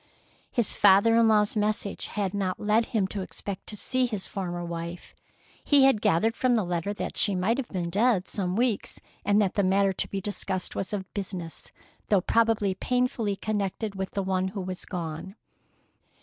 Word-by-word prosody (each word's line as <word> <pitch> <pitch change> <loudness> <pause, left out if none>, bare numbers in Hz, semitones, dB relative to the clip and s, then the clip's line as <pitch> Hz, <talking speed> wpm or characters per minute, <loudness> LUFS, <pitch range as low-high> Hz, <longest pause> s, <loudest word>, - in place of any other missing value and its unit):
His 235 -4 +1
father 200 +4 +6
in 230 -1 +5
law's 210 -1 +3
message 210 -1 -1
had 200 -3 -2
not 190 -2 -2
led 215 +2 +2
him 215 -6 +1
to 200 - -4
expect 190 +1 -7
to 210 - -4
see 255 +4 +1
his 210 -5 -3
former 175 -3 -4
wife. 170 +1 -6 0.5
He 285 -2 +5
had 265 -6 +4
gathered 220 +8 +2
from 255 -1 +2
the 220 - +2
letter 175 +2 -2
that 205 - -4
she 205 -3 +1
might 210 +8 +1
have 255 - -3
been 175 -3 -3
dead 205 -1 +2
some 185 -3 -2
weeks, 235 -2 0 0.2
and 205 +1 +3
that 190 - -1
the 200 - +1
matter 195 +1 +3
to - - -2
be 195 - -3
discussed 190 -2 -2
was 195 - -3
of 195 -3 -5
business, 185 -5 -5 0.4
though 205 - +5
probably 225 -2 +2
painfully 240 -1 0
connected 205 +1 -2
with 190 -1 -4
the 200 - -2
one 185 0 0
who 195 +1 -5
was 185 0 -5
gone. 175 +2 -5
200 Hz, 185 wpm, -27 LUFS, 185-220 Hz, 0.5 s, father